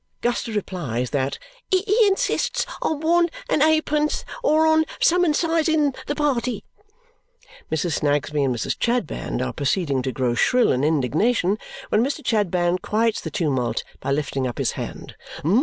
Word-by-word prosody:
Guster 240 -2 -1
replied 145 - -2
that 135 -1 -1 0.3
"he 375 0 +2 0.2
insistes 400 +6 0 0.2
on 310 -2 -1
one 340 +2 +3 0.2
and 300 - +1
eightpence 305 -1 +2 0.2
or 310 +1 +3
on 315 0 +4 0.2
summonsizzing 325 -3 +2
the 290 - -1
party." 255 -6 -1 1.1
Mrs. 160 0 0
Snagsby 145 0 0
and 130 -2 +1
Mrs. 120 - -2
Chadband 235 - -1
are 65 - -4
proceeding 145 -2 0
to 130 +1 -2
grow 125 -2 0
shrill 250 - +3
in 130 +2 0
indignation 170 - +1 0.3
when 215 - +3
Mr. 280 +2 -3
Chadband 180 -4 +1
quiets 220 +2 0
the - - -5
tumult 130 - -1 0.2
by 135 - -3
lifting 140 -2 -1
up 120 - -5
his - - 0
hand. - - -7
205 Hz, 140 wpm, -23 LUFS, -, 1.1 s, on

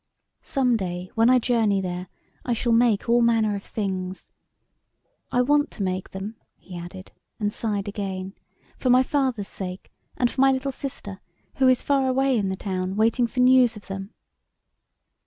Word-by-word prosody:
Some 255 -5 +1
day 180 -2 -5
when 225 +1 +4
I 255 - +6
journey 225 -5 +2
there 180 -1 -4 0.4
I 245 - 0
shall 235 +1 0
make 230 -2 +3
all 240 +1 +4
manner 225 -3 +3
of 200 - -6
things. 190 -3 -4 1.0
I 250 - +3
want 290 +3 +2
to 205 - -4
make 185 0 -2
them," 200 +4 -7 0.2
he 185 - -12
added, 175 +2 -9 0.3
and 210 -1 -1
sighed 205 -3 -2
again, 195 -2 -4 0.5
"for 255 - 0
my 250 +1 +6
father's 260 -7 -1
sake, 185 -1 -7 0.3
and 245 -1 +2
for 265 - -1
my 270 0 +6
little 265 +1 -1
sister, 230 -8 -7 0.4
who 265 - +4
is 255 -1 +3
far 275 -2 +2
away 265 0 +2
in 200 -4 0
the 190 - -2
town 185 -1 -3
waiting 230 +3 +2
for 250 +2 -1
news 250 -2 +5
of 210 - -13
them." 195 +2 -6
220 Hz, 175 wpm, -24 LUFS, 190-250 Hz, 1.0 s, I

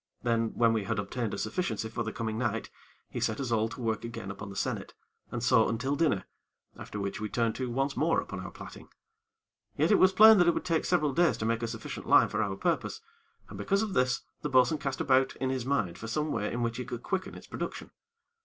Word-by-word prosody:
Then, 115 -2 0
when 115 -1 +4
we 110 -3 -1
had 110 +2 -1
obtained 105 +2 -2
a - - -4
sufficiency 110 - -2
for 110 +1 -4
the 110 -1 -2
coming 110 -1 -3
night, 115 -2 -2 0.4
he - - -3
set 110 - -1
us 130 -3 -3
all 110 -1 +2
to - - -9
work 110 -2 -1
again 115 -4 -6
upon 100 +1 -8
the 100 - -9
sennit, - - -3 0.3
and - - -4
so - - +4
until 125 +5 -1
dinner, 140 -12 +1 0.5
after 105 - -7
which 100 +1 -3
we 110 - -3
turned 115 +2 0
to 130 -2 -2
once 135 +3 -1
more 165 +2 +2
upon - - -6
our - - -6
plaiting. - - -11 0.9
Yet - - +3
it 205 - +5
was 185 - +6
plain 215 +2 +8
that 175 - +5
it 170 - +4
would - - -3
take 165 -3 +1
several 155 -6 +2
days 170 +4 +3
to 110 - -3
make 115 0 0
a 115 - -1
sufficient - - -6
line - - +6
for 110 - -1
our 100 -3 -1
purpose, 95 - -1 0.5
and 100 - -9
because 195 - +1
of 210 -3 -3
this, 125 -1 +2 0.2
the 150 - -2
bo'sun 130 +3 +4
cast 135 -1 -3
about 130 0 +3
in 130 0 -1
his 130 -2 -3
mind 105 -12 0
for 110 - -6
some 150 +6 -1
way 105 -2 -1
in 120 0 -2
which 115 0 -1
he 125 - -4
could 120 -1 -6
quicken 190 -1 -3
its - - -11
production. - - -6
120 Hz, 240 wpm, -29 LUFS, 110-140 Hz, 0.9 s, plain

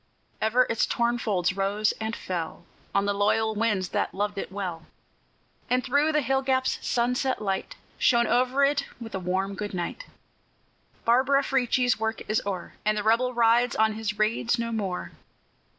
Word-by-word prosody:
Ever 230 +4 +4
its 225 - +1
torn 240 0 0
folds 190 -5 0
rose 200 +2 +1
and 220 +1 -2
fell 170 -1 -5 0.3
On 200 0 +3
the 205 - +1
loyal 220 +2 +1
winds 210 -4 0
that - - -1
loved 205 0 -2
it - - -5
well; 180 -5 -5 0.8
And 250 +1 +2
through 285 +4 +2
the 300 -1 +1
hill 265 +2 +1
gaps 260 -1 0
sunset 250 +2 0
light 195 -2 -3 0.2
Shone 235 -1 +4
over 255 +3 +3
it 285 0 0
with 225 -2 -8
a 190 - -2
warm 190 +2 -1
good 205 0 -5
night. 180 - -4 1.0
Barbara 265 +4 +4
Frietchie's 250 -3 +1
work 220 0 -2
is 215 - +1
o'er, 185 -3 -4
And 215 0 +1
the 210 - -1
Rebel 235 +3 +2
rides 235 +1 +3
on 220 0 +3
his 210 -1 -3
raids 230 +2 +1
no 230 0 -2
more. 195 -5 -3
225 Hz, 165 wpm, -26 LUFS, 200-250 Hz, 1.0 s, Ever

